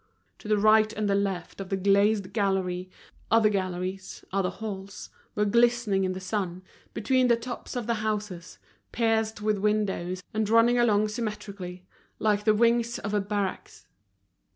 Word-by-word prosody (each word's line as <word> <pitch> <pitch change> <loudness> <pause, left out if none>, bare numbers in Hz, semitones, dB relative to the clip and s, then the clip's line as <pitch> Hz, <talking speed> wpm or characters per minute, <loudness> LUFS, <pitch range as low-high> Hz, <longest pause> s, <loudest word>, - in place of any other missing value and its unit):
To - - -11
the 215 0 +3
right 215 +1 +5
and 215 -1 -2
the 200 - +2
left 195 -2 -2
of 190 - -7
the 195 - 0
glazed 200 0 +2
gallery, 190 -3 -1 0.4
other 225 -1 +5
galleries, 185 -1 -4
other 195 -2 +1
halls, 200 -1 -7 0.2
were 210 - +2
glistening 235 -3 +2
in 185 - -1
the 185 - -6
sun, 185 -1 -3 0.3
between 255 +4 +2
the 235 - +5
tops 245 +2 -7
of 245 -2 -2
the 235 - +1
houses, 210 -5 -4 0.3
pierced 220 -2 0
with 210 -1 +1
windows 190 -3 -1
and 215 -1 0
running 230 +2 +5
along 215 -3 +3
symmetrically, 200 -5 -6 0.3
like 210 -1 +1
the 215 -1 +4
wings 235 +1 +2
of 205 +1 -5
a 205 - +2
barracks. 200 -1 -4
210 Hz, 155 wpm, -27 LUFS, 190-220 Hz, 0.4 s, right